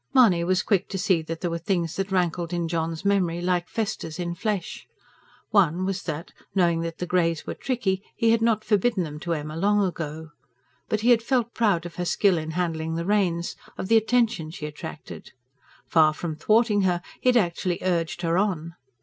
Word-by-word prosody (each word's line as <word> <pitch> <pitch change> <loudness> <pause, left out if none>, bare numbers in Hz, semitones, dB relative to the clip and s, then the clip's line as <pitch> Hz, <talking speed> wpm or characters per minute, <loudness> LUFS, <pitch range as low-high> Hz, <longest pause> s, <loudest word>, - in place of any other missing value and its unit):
Mahony 200 -10 +6
was 185 +1 +1
quick 195 -3 +1
to 195 - -3
see 185 -3 +2
that 160 +1 -6
there 175 - -1
were 170 - -2
things 170 -1 -1
that 195 0 -3
rankled 175 -2 0
in 170 -1 -1
John's 165 +1 -2
memory, 185 -4 +2
like 175 0 0
festers 200 -7 -3
in 175 -1 -3
flesh. 200 +1 -3 0.6
One 185 -3 +3
was 190 -1 -2
that, 165 +1 -5 0.2
knowing 170 -3 +3
the 165 +1 -4
greys 170 -3 +1
were - - -4
tricky, 215 -8 -1
he 230 0 +3
had 230 0 +3
not 225 -2 +2
forbidden 210 -1 +2
them 150 -2 -6
to 170 +2 -2
Emma 155 0 -4
long 205 +4 +2
ago. 160 -3 -5 0.6
But 215 - 0
he 240 +3 +4
had 230 -2 +5
felt 240 -1 0
proud 200 -7 +1
of 175 - -8
her 180 - -2
skill 185 -1 +3
in 155 0 -5
handling 160 -2 -1
the 170 +1 -2
reins, 180 -4 +1 0.2
of 185 - -4
the 225 - +6
attention 225 -7 +1
she 160 -1 -7
attracted. 150 +1 -9 0.5
Far 155 -2 +4
from 160 -2 -4
thwarting 215 +4 +3
her, 180 -2 +1 0.2
he 255 - +3
had 250 - +5
actually 175 -3 0
urged 175 -1 -1
her 170 +1 +2
on. 170 -5 -1
180 Hz, 195 wpm, -25 LUFS, 165-205 Hz, 0.6 s, Mahony